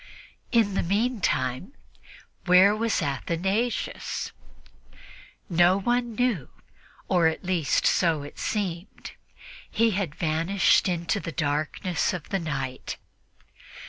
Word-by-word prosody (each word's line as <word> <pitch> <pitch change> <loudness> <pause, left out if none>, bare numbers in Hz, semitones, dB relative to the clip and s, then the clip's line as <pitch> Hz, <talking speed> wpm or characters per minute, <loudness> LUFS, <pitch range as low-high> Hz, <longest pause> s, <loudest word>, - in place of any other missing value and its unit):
In 225 -5 +3
the - - +1
meantime, 195 - -1 0.7
where 185 +3 +6
was 220 -4 0
Athanasius? 185 - -2 1.2
No 175 +1 +4
one 240 +2 0
knew 230 - 0 0.6
or, 175 -3 +3
at 160 - -2
least, 175 -5 +1
so 165 -5 +2
it 145 - -11
seemed. 190 -2 -4 0.6
He 230 0 +2
had 185 -7 -2
vanished 170 +5 +2
into 170 +1 -1
the 165 - -5
darkness 155 +3 -1
of 175 -4 -6
the 195 - 0
night. 135 -6 -4
180 Hz, 105 wpm, -26 LUFS, 160-205 Hz, 1.2 s, where